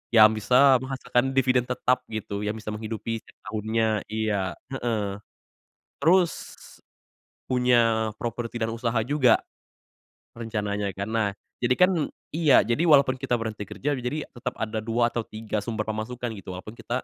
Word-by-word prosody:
Yang 110 -1 +9
bisa 130 +3 +5
menghasilkan 130 0 -1
dividen 125 -1 +3
tetap 125 0 +1
gitu, 105 -2 -4
yang 105 +1 -2
bisa 105 -1 -6
menghidupi 110 +1 -4
setiap - - -21 0.2
tahunnya 110 -1 0
iya, 105 -5 -1 0.2
heeh. 105 -6 -2 0.8
Terus 170 +3 +4 1.2
punya 115 -3 +3
properti 120 +1 -4
dan 115 - -1
usaha 115 0 -2
juga 130 -3 +3 0.9
rencananya 105 -3 -2
kan. 100 +1 -4
Nah, 110 -3 +1 0.3
jadi 125 +1 +2
kan 180 +1 +5 0.4
iya 155 -4 +5
jadi 130 +10 +1
walaupun 140 -3 +6
kita 130 -3 0
berhenti 110 -2 -4
kerja, 135 +8 -2
jadi 130 +4 -3
tetep 125 0 -5
ada 110 0 -2
2 115 +1 +2
atau 120 - -1
3 110 -1 -3
sumber 110 -2 -2
pemasukan 115 +2 -3
gitu, 95 -1 -8
walaupun 100 +4 -8
kita 125 +2 -3
115 Hz, 145 wpm, -26 LUFS, 110-125 Hz, 1.2 s, Yang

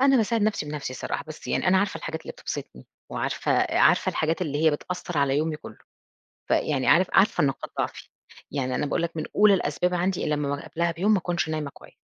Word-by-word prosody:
أنا 270 0 +5
باساعد 225 -1 +1
نَفْسي 205 -8 0
بنَفْسي 145 -3 -5
صراحة، 130 - -4
بس 155 - -9
يعني - - 0
أنا 190 +1 +5
عارفة 200 0 0
الحاجات 160 0 -5
اللي - - -7
بتبسطني، 65 - -7 0.2
وعارفة - - -1 0.3
عارفة - - +4
الحاجات 160 +3 0
اللي 150 0 -1
هي - - +7
بتأثَّر 175 +1 -4
على 140 0 +2
يومي 155 0 0
كله. 110 -8 -11 0.7
فيعني 135 -4 +1
عارف، 180 +2 +5
عارفة 195 -6 +4
نقاط 135 -1 -2
ضعفي. - - -3 0.4
يعني 130 -2 -1
أنا 150 - 0
باقول 145 - -1
لك 170 -1 -3
من 155 - -1
أُولى 210 -1 +6
الأسباب 180 +1 0
عندي 180 +1 0
لما 145 -1 -1
قبلها 170 0 0
بيوم 190 +7 +1
ما 210 - +5
أكونش 170 -2 -1
نايمة 155 -2 -2
كويس. - - -16
160 Hz, 205 wpm, -26 LUFS, 145-185 Hz, 0.7 s, هي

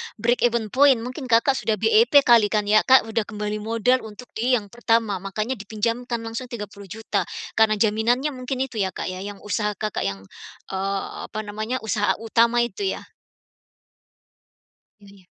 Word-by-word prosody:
break 235 +3 +1
even 230 -3 -2
point, 275 0 +6
mungkin 255 +2 -6
Kakak 250 +3 +3
sudah 220 - 0
BEP 435 - +5
kali 235 -4 +5
kan 210 0 0
ya, 215 - +7
Kak. 260 0 +7
Sudah 225 -1 -2
kembali 210 -1 -4
modal 230 +4 +1
untuk 220 +3 -12
di 245 +3 +1
yang 205 -4 -4
pertama, 225 -4 +1
makanya 215 +6 -4
dipinjamkan 230 +3 -3
langsung 230 +3 -5
Rp30.000.000 205 -3 -5 0.2
karena 220 -1 +3
jaminannya 225 +7 +1
mungkin 255 0 -3
itu 255 -5 -6
ya, 190 -2 -1
Kak, - - -4
ya, 185 - -7
yang 200 +1 -8
usaha 210 0 -1
Kakak 215 +1 -2
yang, 100 -1 -5 0.5
eee, 195 +1 -2 0.2
apa 215 - -6
namanya, 215 +4 -4
usaha 210 -1 +1
utama 230 +2 +2
itu 385 - -2
ya? - - -10 2.0
Iya 200 -2 -17
225 Hz, 160 wpm, -23 LUFS, 210-245 Hz, 2.0 s, ya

